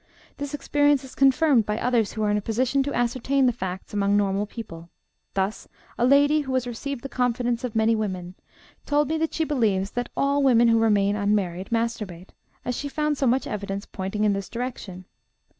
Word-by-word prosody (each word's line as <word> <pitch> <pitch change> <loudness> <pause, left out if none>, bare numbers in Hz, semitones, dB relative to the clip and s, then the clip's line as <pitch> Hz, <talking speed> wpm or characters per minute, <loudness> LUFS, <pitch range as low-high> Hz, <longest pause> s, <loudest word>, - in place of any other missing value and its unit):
This 285 0 -4
experience 290 -1 +2
is 265 - -11
confirmed 270 -3 +4
by 210 0 -1
others 235 -4 +1
who 215 - -2
are 210 - +2
in 210 - +2
a - - -1
position 250 +6 0
to 280 +1 -2
ascertain 255 +3 +1
the 245 - +3
facts 190 -1 -6
among 200 0 +2
normal 200 0 0
people; 170 -7 -9 0.5
thus 195 +1 -2 0.3
a 245 - +2
lady, 285 +3 +5
who 265 -2 -3
has 255 -1 0
received 245 +2 -5
the - - -4
confidence 245 -2 -1
of 245 -3 -4
many 220 +1 +3
women, 185 -4 -3 0.5
told 295 0 +2
me 320 0 0
that 320 0 -1
she 325 - +1
believes 215 -10 0
that 245 0 -3
all 280 +1 +2
women 240 -3 +5
who 230 0 +4
remain 205 -2 +3
unmarried 200 -3 -1
masturbate, 215 -6 -3 0.3
as 250 - -1
she 285 - -4
found 300 +1 0
so 270 -1 0
much 255 +3 +2
evidence 200 -1 -4
pointing 195 +2 -4
in 210 -1 +3
this 195 -2 -4
direction. 230 -7 -6
230 Hz, 195 wpm, -25 LUFS, 205-270 Hz, 0.5 s, lady